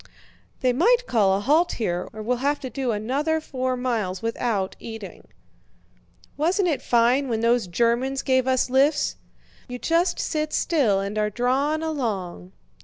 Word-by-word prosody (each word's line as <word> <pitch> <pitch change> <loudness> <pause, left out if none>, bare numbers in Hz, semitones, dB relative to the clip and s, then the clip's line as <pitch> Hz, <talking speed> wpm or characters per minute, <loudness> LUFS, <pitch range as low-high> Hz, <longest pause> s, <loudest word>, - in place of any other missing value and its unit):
"They 255 -1 +2
might 475 - +3
call 200 - +2
a - - -2
halt 310 +10 +2
here 180 -6 -2
or 215 0 -8
we'll 245 +3 0
have 285 +3 0
to 260 -3 -6
do 265 -3 -2
another 275 +9 -1
four 255 -4 -3
miles 225 -7 -2
without 225 -4 -1
eating." 225 -3 -9 1.1
"Wasn't 360 +6 +1
it 310 -5 0
fine 245 +3 +2
when 225 -2 -1
those 235 -2 +2
Germans 240 +8 0
gave 260 -1 +2
us 260 -1 +2
lifts! 275 +4 +2 0.5
You 250 - -6
just 335 +6 +1
sit 305 0 -2
still 255 - +2
and 200 +2 -3
are 210 0 +1
drawn 270 +8 0
along." 200 - -3
250 Hz, 155 wpm, -24 LUFS, 220-290 Hz, 1.1 s, might